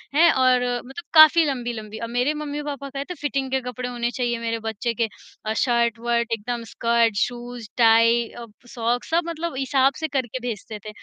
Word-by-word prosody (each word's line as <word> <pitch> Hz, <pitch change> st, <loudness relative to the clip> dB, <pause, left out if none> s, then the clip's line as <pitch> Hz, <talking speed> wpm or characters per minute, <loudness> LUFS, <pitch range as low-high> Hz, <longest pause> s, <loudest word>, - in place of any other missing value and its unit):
हैं? 335 Hz, +2 st, +6 dB
और 255 Hz, -1 st, +4 dB, 0.3 s
मतलब 305 Hz, +6 st, -8 dB
काफ़ी 315 Hz, +1 st, +8 dB
लंबी-लंबी 235 Hz, -5 st, -4 dB
और 230 Hz, -, -4 dB
मेरे 250 Hz, +5 st, +1 dB
मम्मी-पापा 290 Hz, -2 st, -5 dB
कहते 280 Hz, +6 st, -5 dB
फिटिंग 275 Hz, -2 st, -1 dB
के 265 Hz, -, +2 dB
कपड़े 250 Hz, 0 st, -5 dB
होने 240 Hz, 0 st, -2 dB
चाहिए 240 Hz, -2 st, -1 dB
मेरे 230 Hz, 0 st, -2 dB
बच्चे 225 Hz, +1 st, -3 dB
के 230 Hz, 0 st, 0 dB, 0.4 s
अ, 220 Hz, -, 0 dB
शर्ट-वर्ट 235 Hz, -1 st, +1 dB
एकदम 235 Hz, +2 st, -3 dB
स्कर्ट, 230 Hz, -2 st, +2 dB
शूज़ 240 Hz, -1 st, -3 dB
टाइ 230 Hz, 0 st, +5 dB
अ, 235 Hz, -, -9 dB, 0.2 s
प -, -, -20 dB
सॉक्स 240 Hz, +1 st, -1 dB
सब 335 Hz, +1 st, +3 dB
मतलब 335 Hz, -3 st, -4 dB
हिसाब 270 Hz, 0 st, +2 dB
से 315 Hz, -, -1 dB
करके 260 Hz, -3 st, -2 dB
भेजते 215 Hz, -1 st, -6 dB
थे। -, -, -5 dB
245 Hz, 180 wpm, -23 LUFS, 230-275 Hz, 0.4 s, काफ़ी